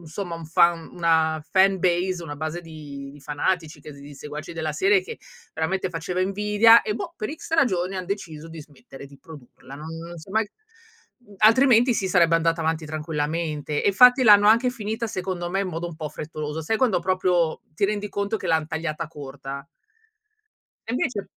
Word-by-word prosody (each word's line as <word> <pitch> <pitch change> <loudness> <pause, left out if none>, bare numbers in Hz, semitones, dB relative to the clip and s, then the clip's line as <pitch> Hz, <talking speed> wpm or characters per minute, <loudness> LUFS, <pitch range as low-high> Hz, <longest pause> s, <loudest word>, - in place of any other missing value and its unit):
insomma 170 +1 -6
un 165 - -9
fan 170 +1 +2
una 160 -2 +1
fanbase, 185 -2 +2
una 145 -3 -6
base 155 +3 -4
di 145 -4 -9
di 145 - -15
fanatici 155 +3 -2
che 150 - -10
s 140 - -14
di 145 +1 -11
seguaci 150 +3 -8
della 160 -2 -3
serie, 195 +5 +3
che - - -9 0.4
veramente 185 +3 -1
faceva 180 +2 -3
invidia 210 +4 +5
e 210 - -2
boh, 205 -2 -5
per 215 - -4
X 325 - -12
ragioni 195 - +1
han 185 -1 -5
deciso 165 -6 -6
di 165 - -10
smettere 140 -1 -14
di 140 0 -17
produrla, 140 -3 -13
non 150 +2 -9
non 170 +1 -9
si 160 - -14
è - - -9
mai 220 -1 +1 0.7
mhmm, 210 -5 -19
altrimenti 240 +3 +5
sì 195 -3 -1
sarebbe 170 -2 +4
andata 165 0 0
avanti 160 0 -1
tranquillamente, 150 -1 -3
e - - +4
infatti 250 +6 +6
l'hanno 205 -2 +7
anche 235 +3 +4
finita 225 -1 -4
secondo 180 -3 -4
me 195 +2 0
in 195 - -2
modo 170 0 -4
un 170 - -9
po' 155 -2 -5
frettoloso. 155 +1 -6
Sai 220 +8 -1
quando 230 -9 +2
proprio 180 -2 +1
ti 200 - 0
rendi 210 0 -1
conto 200 +2 -2
che - - -6
l'han 160 -1 +1
tagliata 160 0 -4
corta? 140 -1 -8 1.2
E - - -3
invece 245 -5 -1
170 Hz, 190 wpm, -24 LUFS, 155-200 Hz, 1.2 s, l'hanno